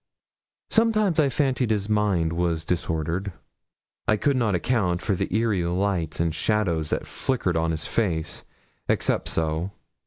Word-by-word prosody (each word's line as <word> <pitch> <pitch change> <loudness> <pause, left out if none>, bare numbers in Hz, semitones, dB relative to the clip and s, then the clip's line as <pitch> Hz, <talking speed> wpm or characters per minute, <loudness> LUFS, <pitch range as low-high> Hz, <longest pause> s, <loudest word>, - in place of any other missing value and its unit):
Sometimes 215 -6 +3
I 145 -3 +4
fancied 130 -4 +1
his 105 -2 0
mind 100 -6 +1
was 85 -2 0
disordered. 85 +2 -1 0.7
I 110 - +4
could 140 +5 +2
not 115 -6 +2
account 90 -2 +1
for 100 - 0
the 95 - -2
eerie 110 -2 +1
lights 85 -2 -1
and 85 -1 +1
shadows 85 -6 0
that - - -1
flickered 115 -10 -1
on 80 0 +1
his 80 -1 -2
face, 85 -9 -1 0.5
except - - +1
so. 80 +4 -1
95 Hz, 145 wpm, -25 LUFS, 85-110 Hz, 0.7 s, I